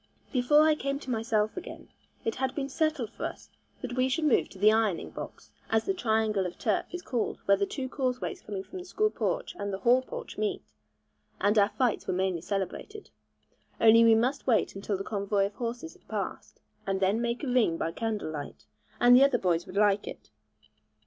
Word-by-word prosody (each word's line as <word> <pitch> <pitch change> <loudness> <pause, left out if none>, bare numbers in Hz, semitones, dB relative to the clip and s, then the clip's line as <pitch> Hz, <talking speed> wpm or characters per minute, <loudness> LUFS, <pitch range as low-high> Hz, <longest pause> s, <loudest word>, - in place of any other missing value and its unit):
Before 290 +4 +5
I 310 - +5
came 275 -2 -2
to 260 - -5
myself 220 -2 0
again, 365 - -8 0.4
it 225 - 0
had 260 0 -1
been 275 -2 -2
settled 290 -6 -1
for - - -8
us - - -7 0.3
that 250 -1 -4
we 255 0 +2
should 315 +5 0
move 290 - +3
to - - -13
the 210 +3 +5
'Ironing 220 -6 0
box,' - - -9 0.2
as 220 0 +2
the 390 - +1
triangle 220 - +1
of 175 - -9
turf - - 0
is 355 0 -6
called 240 -3 -2
where 200 - +5
the 200 0 -1
two 265 -2 -4
causeways 255 -2 -3
coming 195 -2 -5
from 375 - -9
the 360 - -9
school 425 +3 0
porch - - -2
and 200 - -3
the 190 - -3
hall 245 +5 +4
porch 485 - -8
meet, 400 -2 -1 0.8
and 205 +1 +2
our 200 0 +4
fights 250 -3 -1
are - - +1
mainly 185 -2 0
celebrated; 200 - -5 0.7
only 230 0 +7
we 225 -1 +7
must 255 +6 0
wait 230 -4 +2
until 195 0 -2
the 195 - -4
convoy 200 -1 0
of 200 - -5
horses 240 +8 -5
had - - -25
passed, - - -5 0.3
and 195 0 0
then 195 +4 +2
make 235 +3 -2
a - - -2
ring 245 -10 +2
by 165 - -2
candlelight, 170 -9 -4 0.3
and 245 0 +7
the 260 - +7
other 275 -3 +4
boys 175 -4 0
would 195 - -7
like 205 -1 +3
it. - - -9
230 Hz, 205 wpm, -29 LUFS, 200-265 Hz, 0.8 s, only